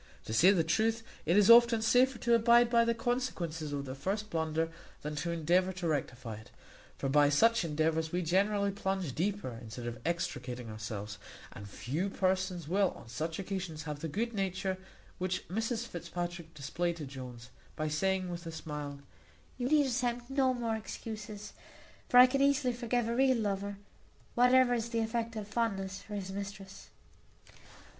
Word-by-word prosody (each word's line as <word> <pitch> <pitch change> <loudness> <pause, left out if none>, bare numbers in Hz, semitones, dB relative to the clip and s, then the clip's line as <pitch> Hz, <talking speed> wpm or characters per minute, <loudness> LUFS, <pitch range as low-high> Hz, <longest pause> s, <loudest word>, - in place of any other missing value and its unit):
To 110 - -4
say 165 +12 +6
the 185 -4 +4
truth, 225 +7 +1 0.2
it 170 +4 +4
is 205 -1 +6
often 235 -1 +7
safer 250 +3 +4
to 235 0 +1
abide 235 +1 +5
by 235 -1 +5
the 235 0 +1
consequences 180 - -2
of 140 -1 -3
the 130 - -5
first 200 +10 -3
blunder 160 0 0 0.3
than 150 +1 -3
to 170 - -2
endeavour 170 +3 +2
to 180 -2 -3
rectify 125 -7 -3
it; 110 - -14 0.5
for - - -2
by 145 +1 +5
such 230 +9 +4
endeavours 160 0 0
we 180 +1 0
generally 200 +4 +2
plunge 190 -6 -2
deeper 170 - -2
instead 115 +1 -8
of 120 0 -5
extricating 125 -8 -3
ourselves; 105 -1 -6 0.3
and 100 0 -9
few 155 - -2
persons 185 -3 0
will 190 +3 +3
on 115 - -13
such 160 +7 -3
occasions 185 -5 -4
have 150 -1 -5
the 165 - -3
good 230 +9 -2
nature 190 -1 -2 0.4
which 185 0 -2
Mrs 225 +4 -1
Fitzpatrick 175 -3 -5
displayed 170 +4 -2
to 155 -3 -6
Jones, 125 -3 -9 0.2
by 155 - -2
saying, 185 +4 0
with 170 -1 -6
a - - -4
smile, 150 -3 -6 0.6
"You 245 - 0
need 300 -1 +5
attempt 245 -1 -1
no 270 -1 +3
more 235 -3 -1
excuses; 215 -1 -7 0.6
for 245 - +4
I 250 - +12
can 275 +2 0
easily 275 -2 +3
forgive 240 -1 -1
a 235 - -1
real 260 0 +4
lover, 200 -2 -2 0.6
whatever 250 0 +5
is 235 -1 -1
the 230 -1 0
effect 225 0 -2
of 210 -2 -5
fondness 195 -4 -2
for 210 - -8
his 190 -2 -4
mistress." 195 0 -7
190 Hz, 170 wpm, -32 LUFS, 155-230 Hz, 0.6 s, I